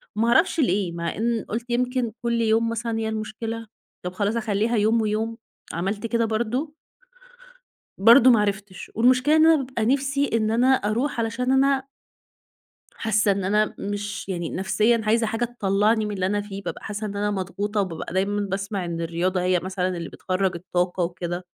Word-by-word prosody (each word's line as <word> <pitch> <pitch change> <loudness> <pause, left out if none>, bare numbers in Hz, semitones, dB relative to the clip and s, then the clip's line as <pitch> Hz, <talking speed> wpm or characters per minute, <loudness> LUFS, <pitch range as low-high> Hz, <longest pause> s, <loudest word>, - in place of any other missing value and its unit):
ما 225 +2 +1
أعرفش 335 +6 +3
ليه، 195 - +1
مع 170 0 -3
إن 230 +1 -1
قُلت 235 +3 -4
يمكن 250 -1 0
كل 235 0 +1
يوم 225 +1 +2
مثلًا 230 0 -2
هي 220 0 -1
المشكلة، 220 +1 -5 0.4
طب 180 - -3
خلاص 205 +3 -1
أخلِّيها 225 0 0
يوم 220 +2 +3
ويوم، 220 +2 -1 0.4
عملت 195 +6 -2
كده 230 +1 +1
برضه. 235 +7 -2 1.2
برضه 235 +5 +7
ما 230 -4 +5
عرفتش. 200 -2 -3
والمشكلة 255 +6 +4
أنا 320 0 +6
بابقى 255 -5 -2
نفسي 275 +2 +1
إن 220 -1 +1
أنا 240 +3 +3
أروح 235 +4 -1
علشان 230 +3 -1
أنا 270 0 +3 1.1
حاسَّة 215 -2 +2
إن 195 -1 -2
أنا 210 +3 +1
مش 205 0 -4
يعني، 170 -4 -3
نفسيًا 215 +5 +1
عايزة 225 +1 +2
حاجة 225 +2 -1
تطلَعِني 215 -1 +1
من 210 - -4
اللي 185 -1 -1
أنا 205 +1 0
فيه. 200 -1 -7
بابقى - - -6
حاسَّة 210 0 -4
إن 200 - -5
أنا 205 +1 0
مضغوطة، 205 +2 -2
وبابقى 175 -3 -4
دايمًا 200 +2 0
باسمَع 195 -1 -3
إن 170 -1 -4
الرياضة 175 +3 -1
هي 180 -1 +2
مثلًا 185 -1 -2
اللي 170 -1 -5
بتخرّج 185 0 -1
الطاقة 180 +1 -1
وكده. 175 +1 -4
215 Hz, 170 wpm, -24 LUFS, 195-235 Hz, 1.2 s, برضه